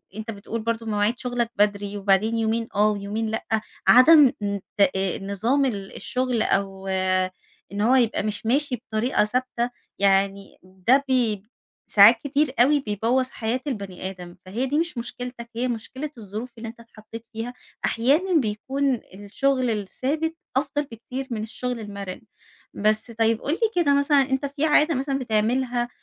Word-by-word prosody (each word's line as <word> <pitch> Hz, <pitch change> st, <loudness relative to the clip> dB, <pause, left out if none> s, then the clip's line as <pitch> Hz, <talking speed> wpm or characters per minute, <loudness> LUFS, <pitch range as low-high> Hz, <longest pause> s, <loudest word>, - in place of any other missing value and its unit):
أنت 220 Hz, +1 st, -5 dB
بتقول 220 Hz, +2 st, -5 dB
برضه 230 Hz, 0 st, -2 dB
مواعيد 210 Hz, +2 st, 0 dB
شغلك 245 Hz, -2 st, -2 dB
بدري 205 Hz, 0 st, 0 dB
وبعدين 200 Hz, +3 st, +2 dB
يومين 225 Hz, +1 st, 0 dB
آه 210 Hz, +1 st, +4 dB
ويومين 210 Hz, +2 st, -3 dB
لأ، 220 Hz, -, -3 dB, 0.4 s
عدم 280 Hz, +1 st, +8 dB
ن 200 Hz, -1 st, -1 dB, 0.2 s
آآ، 190 Hz, -1 st, +2 dB
نظام 220 Hz, +8 st, 0 dB
ال 200 Hz, -6 st, -4 dB
الشغل 250 Hz, -3 st, -1 dB
أو، 195 Hz, -1 st, -1 dB, 0.8 s
إن 205 Hz, +1 st, -3 dB
هو 245 Hz, +4 st, +4 dB
يبقى 235 Hz, -5 st, +2 dB
مش 210 Hz, 0 st, -4 dB
ماشي 270 Hz, +2 st, +1 dB
بطريقة 225 Hz, 0 st, 0 dB
ثابتة، 245 Hz, +1 st, -1 dB, 0.3 s
يعني 195 Hz, 0 st, +1 dB
ده 190 Hz, +9 st, +2 dB
بي 230 Hz, -6 st, +1 dB, 0.5 s
ساعات 220 Hz, +3 st, +8 dB
كتير 285 Hz, -1 st, +1 dB
أوي 285 Hz, +4 st, +5 dB
بيبوظ 240 Hz, +3 st, 0 dB
حياة 230 Hz, +3 st, -2 dB
البني 195 Hz, -6 st, -4 dB
آدم، 180 Hz, -2 st, -10 dB
فهي 225 Hz, +8 st, -2 dB
دي 290 Hz, +3 st, 0 dB
مش 335 Hz, -6 st, -2 dB
مشكلتك 240 Hz, 0 st, -6 dB
هي 250 Hz, +2 st, 0 dB
مشكلة 255 Hz, +5 st, -5 dB
الظروف 215 Hz, +3 st, -6 dB
اللي 225 Hz, 0 st, -7 dB
أنت 235 Hz, -, -13 dB
اتحطيت 225 Hz, 0 st, -12 dB
فيها، 230 Hz, +3 st, -5 dB, 0.3 s
أحيانًا 295 Hz, +11 st, +2 dB
بيكون 265 Hz, +5 st, -1 dB, 0.2 s
الشغل 250 Hz, +6 st, 0 dB
الثابت 275 Hz, -, -2 dB, 0.2 s
أفضل 290 Hz, +1 st, 0 dB
بكتير 260 Hz, +1 st, -7 dB
من 215 Hz, -2 st, -2 dB
الشغل 245 Hz, +2 st, -4 dB
المرن. 200 Hz, -3 st, -7 dB, 0.5 s
بس 215 Hz, +3 st, 0 dB
طيب 225 Hz, 0 st, +1 dB
قُل 290 Hz, -, -1 dB
لي 445 Hz, +4 st, +1 dB
كده 280 Hz, -1 st, +4 dB
مثلًا 280 Hz, 0 st, +4 dB
أنت 265 Hz, +1 st, 0 dB
في 285 Hz, +2 st, -1 dB
عادة 305 Hz, 0 st, +4 dB
مثلًا 275 Hz, +1 st, -1 dB
بتعملها 240 Hz, +2 st, 0 dB
230 Hz, 150 wpm, -24 LUFS, 205-260 Hz, 0.8 s, عدم